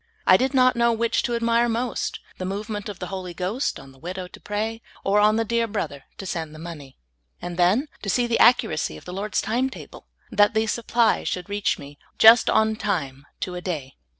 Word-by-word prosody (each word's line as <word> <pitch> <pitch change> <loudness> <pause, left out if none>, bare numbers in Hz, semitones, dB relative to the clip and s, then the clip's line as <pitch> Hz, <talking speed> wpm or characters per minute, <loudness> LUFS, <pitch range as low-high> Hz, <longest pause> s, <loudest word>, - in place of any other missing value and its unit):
I - - +7
did 260 +6 +1
not 255 -1 +5
know 235 0 +3
which 230 0 +1
to 240 - -1
admire 235 +1 +2
most, 235 +1 -2 0.2
the - - -3
movement 205 +2 -4
of 200 - -7
the - - -5
Holy 180 -2 -5
Ghost 195 - -2
on 135 - -13
the 135 - -20
widow 180 +4 -6
to - - -13
pray, 220 +2 -3 0.2
or 200 +1 +3
on 210 +1 +4
the 225 0 +1
dear 235 +1 0
brother 200 -10 -4
to 195 - -7
send 160 -4 -4
the - - -10
money. 155 -5 -9 0.4
And 175 0 -6
then 185 - +3
to 200 - -4
see 245 +5 +2
the 235 -1 0
accuracy 240 -1 +3
of - - -15
the 180 - -7
lyord's 200 +2 -1
time 245 +4 0
table, - - -12 0.2
that 210 -1 +4
the 220 0 +2
sup 225 +1 -3
ply 235 -2 +3
should 180 +2 -3
reach 205 0 0
me 145 0 -12 0.2
just 225 +2 +8
on 220 0 +2
time 140 -10 -3
to 185 - -3
a 180 - -5
day. 150 -8 -5
210 Hz, 220 wpm, -24 LUFS, 180-230 Hz, 0.4 s, just